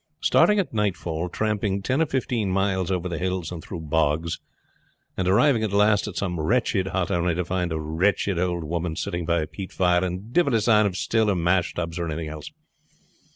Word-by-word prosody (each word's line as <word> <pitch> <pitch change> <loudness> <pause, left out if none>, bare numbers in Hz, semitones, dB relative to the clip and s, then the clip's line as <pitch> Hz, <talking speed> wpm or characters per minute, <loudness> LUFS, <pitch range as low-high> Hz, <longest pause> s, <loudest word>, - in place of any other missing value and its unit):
Starting 210 - +4
at 195 -10 -1
nightfall, 90 -5 -1
tramping 105 0 -1
ten 130 +9 0
or 160 - +2
fifteen 120 -6 -1
miles 95 -1 0
over 90 -1 -1
the 85 -3 -4
hills 90 -2 -2
and 85 -2 -7
through 90 - -6
bogs, 80 +1 0 0.8
and 95 - -1
arriving 115 +6 +4
at 110 -3 -1
last 105 +1 +3
at 100 - -6
some 90 -4 -2
wretched 100 +2 +1
hut 95 -1 -1
only 85 -1 +1
to 90 0 -1
find 90 -1 -1
a 80 - -2
wretched 85 +4 0
old 85 -1 -1
woman 85 +1 -3
sitting 85 0 -3
by 85 -2 +2
a - - -3
peat 95 +3 -8
fire, 90 -1 +2
and 95 +6 -5
divil 155 -8 +3
a 110 - +2
sign 105 -1 +4
of 95 -2 -4
still 110 +1 +1
or 100 - +2
mash 85 +1 +1
tubs 85 0 -3
or 85 - -2
anything 80 0 -4
else. 75 -1 -8
90 Hz, 205 wpm, -24 LUFS, 85-105 Hz, 0.8 s, Starting